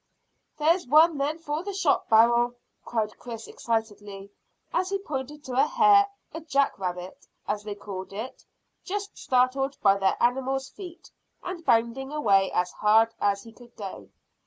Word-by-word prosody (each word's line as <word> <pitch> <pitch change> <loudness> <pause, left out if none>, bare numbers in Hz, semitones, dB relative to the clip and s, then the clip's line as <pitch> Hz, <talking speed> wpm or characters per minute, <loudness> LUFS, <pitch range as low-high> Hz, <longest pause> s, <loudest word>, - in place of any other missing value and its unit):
"There's 325 +1 +2
one 310 +2 +5
then 295 +3 -1
for 310 -1 -3
the 400 0 -5
shot 345 -7 +1
barrel," 235 +2 +4 0.3
cried 220 -3 -3
Chris 230 -2 -8
excitedly, 205 -3 -4 0.4
as 370 - 0
he 395 - 0
pointed 295 -5 -6
to 260 - -7
a - - +1
hare 420 -4 +5 0.3
a 325 - -5
jack 280 -7 0
rabbit, 180 0 -6 0.2
as 210 0 -2
they 210 -1 -5
called 190 -2 -8
it 220 +6 -7 0.4
just 405 +1 -5
startled 265 +2 +1
by 200 -1 +5
their 195 -1 +1
animals' 265 +2 0
feet, 360 -4 -11 0.3
and 355 -2 -6
bounding 235 +1 +1
away 200 -10 +2
as 180 0 0
hard 225 +2 +3
as 200 -1 +1
he 230 - -13
could 240 0 -17
go. 195 -3 -8
250 Hz, 160 wpm, -26 LUFS, 210-305 Hz, 0.4 s, one